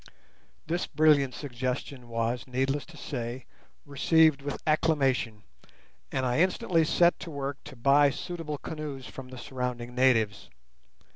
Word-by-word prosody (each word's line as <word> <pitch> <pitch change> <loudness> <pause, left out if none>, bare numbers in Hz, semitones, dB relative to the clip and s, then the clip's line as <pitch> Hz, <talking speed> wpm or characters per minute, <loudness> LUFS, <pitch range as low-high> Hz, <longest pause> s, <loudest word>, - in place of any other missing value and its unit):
This 170 +3 -1
brilliant 150 -3 +3
suggestion 125 -1 -4
was, 115 +2 -2
needless 135 +3 -1
to 165 -2 -14
say, 125 -3 -5 0.4
received 155 +1 +4
with 145 +1 -4
acclamation; 135 -8 +1 0.7
and 130 -1 -1
I 125 +3 +1
instantly 175 -2 +2
set 170 +2 +3
to 175 - -7
work 140 -2 -4
to 145 - -10
buy 140 +4 +5
suitable 165 0 -5
canoes 145 -4 -6
from 130 -1 -9
the 130 - -9
surrounding 125 -1 -4
natives. 115 -5 +2
135 Hz, 130 wpm, -28 LUFS, 125-155 Hz, 0.7 s, buy